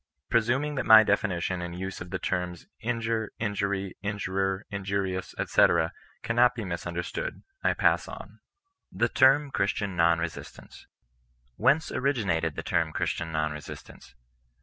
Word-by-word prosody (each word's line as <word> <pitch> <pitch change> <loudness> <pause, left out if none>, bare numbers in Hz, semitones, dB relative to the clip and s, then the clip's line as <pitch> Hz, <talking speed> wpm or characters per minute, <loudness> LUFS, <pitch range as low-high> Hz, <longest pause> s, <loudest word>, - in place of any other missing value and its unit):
Presuming 120 +6 +2
that 130 -3 -2
my 110 0 +10
definition 95 -4 0
and 85 0 -5
use 95 +1 -5
of 90 - -7
the - - -2
terms 90 -1 -3 0.2
injure^ 115 -1 -1
injury, 100 -3 -2
injurer, 95 -1 -2
injurious, 100 -2 -3
&c., - - +5 0.6
cannot 120 +2 +3
be 115 -3 -4
misunderstood, 85 - -4 0.2
I - - +2
pass - - +2
on. - - -10 0.5
THE 115 +5 +1
TEBM 135 +3 +4
GHBISTIAN 100 -2 -1
NON 85 -1 +3
BESISTANCE. 85 0 -7 0.7
Whence 155 +4 +2
originated 100 - 0
the - - -5
term 80 -1 0
Christian 80 +1 -2
non 75 -1 0
resistanee? 75 -4 -10
100 Hz, 130 wpm, -27 LUFS, 90-115 Hz, 0.7 s, my